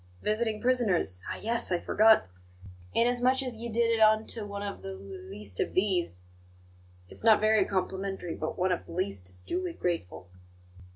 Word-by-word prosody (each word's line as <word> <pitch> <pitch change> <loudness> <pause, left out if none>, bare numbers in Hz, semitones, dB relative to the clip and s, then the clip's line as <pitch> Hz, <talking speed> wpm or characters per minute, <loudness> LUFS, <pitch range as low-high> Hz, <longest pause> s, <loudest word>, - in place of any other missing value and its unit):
Visiting 215 0 0
prisoners 210 - +1
ah, - - -3
yes! 230 -1 0
I 175 - +2
forgot. 220 - +4 0.7
'Inasmuch 245 +3 +3
as 250 -3 -4
ye 235 +2 -6
did 230 +1 +2
it 225 - +1
unto 220 0 +3
one 200 0 -5
of 200 -1 -5
the 95 - -6
l - - -8 0.3
least 100 -2 -5
of - - -1
these' 180 - 0 0.8
it's - - -10
not 220 -1 +6
very 215 -2 +4
complimentary, 190 -2 -3
but 155 - -4
one 185 +1 +1
of 180 - -2
the - - -9
least 100 - -3
is 90 0 -9
duly 175 - -3
grateful." 165 - -3
200 Hz, 170 wpm, -29 LUFS, 170-225 Hz, 0.8 s, not